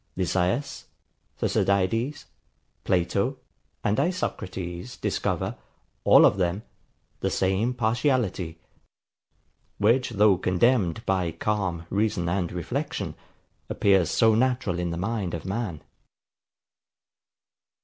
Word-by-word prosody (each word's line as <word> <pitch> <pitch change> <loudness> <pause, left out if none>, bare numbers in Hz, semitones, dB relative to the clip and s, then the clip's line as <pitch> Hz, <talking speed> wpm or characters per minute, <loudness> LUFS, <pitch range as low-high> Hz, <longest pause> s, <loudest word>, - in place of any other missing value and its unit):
Lysias, 95 +8 -1 0.5
Thucydides, 115 +8 0 0.6
Plato, 100 +9 0 0.5
and 105 +1 +1
Isocrates 95 - -3
discover, - - -2 0.5
all - - +8
of - - +4
them, 95 +3 0 0.6
the - - 0
same 95 +6 0
partiality; 110 - 0 1.2
which, 120 +5 +3
though 105 -4 +4
condemned 95 +1 +2
by 95 -3 0
calm 95 -3 -2
reason 100 -4 0
and 85 -1 -1
reflection, 100 - -3 0.6
appears 95 -5 +3
so 110 +5 +4
natural 115 -6 +1
in 90 -1 -1
the 85 - -3
mind 100 -2 -2
of 85 - -7
man. 95 -5 -3
100 Hz, 95 wpm, -26 LUFS, 90-115 Hz, 1.2 s, all